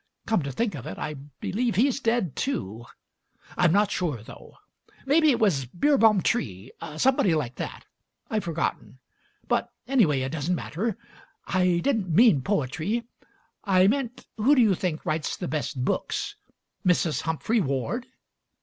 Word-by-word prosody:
Come 220 -5 +1
to 140 -1 -4
think 225 - -1
of 140 -6 -7
it, 95 - -6
I 150 - -4
believe 165 - -3
he's 260 +6 +2
dead, 230 - 0
too. 115 - -3 0.7
I'm 175 -3 +3
not 205 +2 +3
sure, 150 -12 -2
though; - - -13 0.5
maybe 310 +3 +4
it 255 - +3
was 175 - +2
Beerbohm 220 - +3
Tree 105 - -1
— 155 - -8
somebody 210 -5 +3
like 135 -6 -2
that. - - -6 0.4
I've 220 -6 -1
forgotten; 165 -5 -3 0.5
but, - - 0 0.2
anyway, 195 - +3
it 130 - -2
doesn't 160 +3 -1
matter. 200 +7 -3 0.5
I 180 -2 +2
didn't 220 -9 0
mean 170 - +5
poetry; 195 - -1 0.6
I 185 -3 +4
meant 245 +2 0
who 250 +7 +4
do 255 - +5
you 210 -3 +4
think 175 -3 -3
writes 155 -1 -1
the - - -4
best 145 -2 -2
books? - - -2 0.5
Mrs. 175 -3 +2
Humphry 160 - 0
Ward?" 170 - -2
180 Hz, 150 wpm, -26 LUFS, 150-230 Hz, 0.7 s, mean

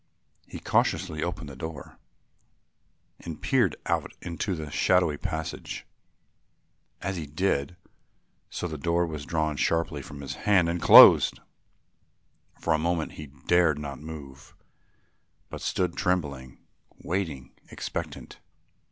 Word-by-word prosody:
He - - -8
cautiously 80 0 0
opened 85 -3 -3
the 70 - -9
door 80 +3 -8 1.2
and 80 -3 -8
peered 120 - +2
out - - -1
into 85 +3 -3
the 75 -3 -7
shadowy 90 -5 +2
passage. 80 +3 -5 1.2
As 95 -1 -2
he 80 -3 -5
did 75 0 -1 0.7
so 90 - -4
the 80 -3 -6
door 85 +3 +1
was 75 -3 -6
drawn 80 -3 -1
sharply 80 -3 0
from 70 +1 -10
his 70 - -5 0.2
hand 95 -4 +5
and 85 0 -2
closed. - - +9 1.2
For 85 - +1
a 80 - +1
moment 85 0 -1
he 75 - -9
dared 80 +2 +2
not 70 -3 -6
move, 75 -4 -10 1.0
but - - -7
stood 90 -2 -1
trembling, 70 -8 -2 0.5
waiting, 80 -8 -3 0.2
expectant. - - -6
80 Hz, 120 wpm, -27 LUFS, 75-85 Hz, 1.2 s, closed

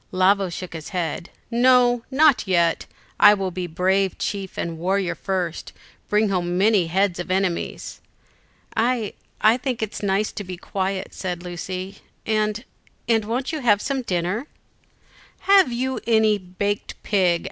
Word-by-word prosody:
Lavo 190 +1 +3
shook 175 +1 -7
his 160 -2 -7
head. 170 -1 -3 0.2
"No, 245 0 +4
not 280 -4 +4
yet; 170 -3 +2 0.3
I 210 - +8
will 190 -2 -3
be 180 0 -4
brave 190 +3 +1
chief 195 -2 -4
and 165 -1 -4
warrior 190 +1 0
first, 180 -4 -3 0.4
bring 210 0 +2
home 175 -2 -1
many 200 -3 +3
heads 185 +1 +1
of 175 - -5
enemies." 185 -2 -2 0.7
"I 230 -2 0 0.3
I 220 +3 +5
think 250 -3 -3
it 215 - -5
nice 200 +1 0
to 205 - -6
be 180 -1 -7
quiet," 190 +1 -3
said 180 -2 -4
Lucy; 185 +2 -6 0.3
"and 215 0 0 0.4
and 225 -2 +2
won't 245 +4 -2
you 315 - -3
have 220 -6 +3
some 270 +4 -2
dinner?" 190 - -2 0.9
"Have 390 -8 +5
you 260 +2 -2 0.6
baked 205 0 -1
a - - -35
pig?" 180 -5 +2
195 Hz, 145 wpm, -23 LUFS, 180-225 Hz, 0.9 s, I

